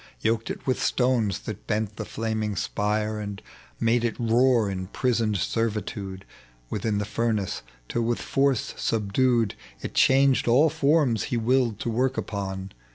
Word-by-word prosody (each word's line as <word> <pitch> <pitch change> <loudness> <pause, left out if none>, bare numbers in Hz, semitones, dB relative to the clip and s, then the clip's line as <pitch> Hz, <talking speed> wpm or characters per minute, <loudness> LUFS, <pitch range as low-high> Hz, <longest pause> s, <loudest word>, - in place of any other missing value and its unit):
Yoked 115 0 0
it - - -6
with 130 - 0
stones 125 -5 +1
that 105 -1 -7
bent 105 -1 -1
the 110 - -4
flaming 110 -2 -2
spire 105 +2 -1
And 100 -1 -5 0.4
made 115 +1 +2
it 120 0 -1
roar 120 -1 +3
in 95 -1 -4
prisoned 115 -1 0
servitude 100 -3 -2 0.5
Within 105 0 -1
tlie 105 - -1
furnace, 105 -2 -1 0.3
tOl 120 - -1
with 115 +1 0
force 135 -3 +1
subdued 115 +1 +1 0.3
It - - -5
changed 135 -1 +4
all 140 +6 +5
forms 140 -8 +2
he 120 - -1
willed 120 -1 +2
to 120 - -1
work 130 +3 0
upon. 95 -2 -4
115 Hz, 150 wpm, -26 LUFS, 105-125 Hz, 0.5 s, all